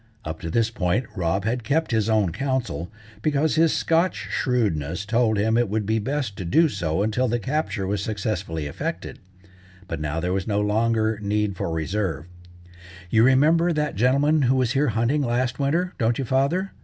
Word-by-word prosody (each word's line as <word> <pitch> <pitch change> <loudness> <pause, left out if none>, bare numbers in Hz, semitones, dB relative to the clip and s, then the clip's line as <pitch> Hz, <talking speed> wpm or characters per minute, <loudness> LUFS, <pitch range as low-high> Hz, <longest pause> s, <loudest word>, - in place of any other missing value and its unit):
Up 80 +1 -5
to 85 - -5
this 115 +5 +1
point 95 +4 0
Rob 95 +1 -1
had 120 +2 -1
kept 155 +7 0
his 110 -1 +1
own 105 -5 +2
counsel, 120 - -2 0.3
because 150 +2 +1
his 160 0 +4
Scotch 165 +3 +1 0.2
shrewdness 95 - -1
told 110 0 +2
him 110 +3 +2
it 120 -4 +1
would 105 0 -1
be 110 +2 +1
best 130 -2 -2
to - - -4
do 160 - +3
so 90 - -1
until 110 +4 0
the 120 +1 0
capture 120 -4 -2
was 100 +1 -1
successfully 95 -7 -3
effected. 70 - -5 0.7
But 80 -3 -4
now 75 +1 -2
there 90 +2 -1
was 95 0 -2
no 105 -1 +1
longer 110 +1 +1
need 105 -1 -1
for 95 0 -3
reserve. 80 -1 -2 0.9
"You 110 - +4
remember 155 +8 +4
that 150 -1 -1
gentleman 140 +7 +3
who 130 0 +3
was 130 -2 +1
here 140 +2 +2
hunting 120 +6 +1
last 125 0 -1
winter, 165 +6 0
don't 115 -1 +1
you, 135 - -2
father?" 140 +10 0
110 Hz, 180 wpm, -24 LUFS, 100-135 Hz, 0.9 s, his